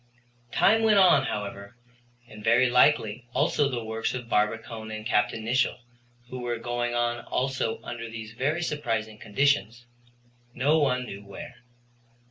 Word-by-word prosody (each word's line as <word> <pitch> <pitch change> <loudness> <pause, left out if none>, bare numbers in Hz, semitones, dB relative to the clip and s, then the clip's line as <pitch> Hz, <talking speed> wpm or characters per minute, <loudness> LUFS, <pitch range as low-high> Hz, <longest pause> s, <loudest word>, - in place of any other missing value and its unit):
Time 225 +2 +4
went 220 -2 +4
on, 180 -8 +6
however, 100 -1 -5 0.5
and 105 -3 -12
very 125 +3 +4
likely 125 -3 +3
also 145 -2 +2
the 120 -3 -3
works 110 +2 -2
of 125 -2 -6
Barbicane 110 +1 -1
and 110 0 -6
Capt. 110 -3 +2
Nicholl 115 +3 0 0.5
who 130 - -5
were 120 -1 -2
going 120 +1 -2
on 120 0 0
also 130 -3 -1
under 115 -1 -6
these 110 -1 -8
very 145 +8 -1
surprising 115 -9 -2
conditions, 120 -1 0 0.7
no 145 +5 +3
one 125 -3 +1
knew 100 -3 -8
where. 100 +3 -10
120 Hz, 140 wpm, -27 LUFS, 110-130 Hz, 0.7 s, on